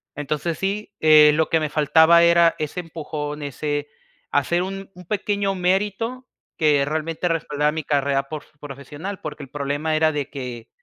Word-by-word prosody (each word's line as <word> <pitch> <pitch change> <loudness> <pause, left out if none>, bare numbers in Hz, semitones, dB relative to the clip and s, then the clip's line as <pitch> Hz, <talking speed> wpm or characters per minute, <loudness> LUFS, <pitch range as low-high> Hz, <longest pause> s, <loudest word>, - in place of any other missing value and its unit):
entonces 150 +3 -3
sí, 200 +2 -2
eh, 155 -1 +7
lo 160 +1 +1
que 165 - +3
me 155 -1 -2
faltaba 160 +3 +5
era 170 0 +5
ese 155 +3 -3
empujón, 150 -3 -6
ese 145 +1 -3 0.4
hacer 170 +5 +1
un 195 +1 -6
un 180 0 -13
pequeño 200 0 -1
mérito 205 +7 -1 0.3
que 150 -3 +3
realmente 160 +3 -2
respalda 150 -3 0
mi 160 0 -4
carrera 140 -1 +1
porf 155 -2 -7
profesional, 145 +7 -7
porque 145 - -7
el 135 - -11
problema 145 +3 -2
era 155 0 +3
de 145 -3 -3
que, 125 -4 -7
155 Hz, 160 wpm, -22 LUFS, 145-175 Hz, 0.4 s, eh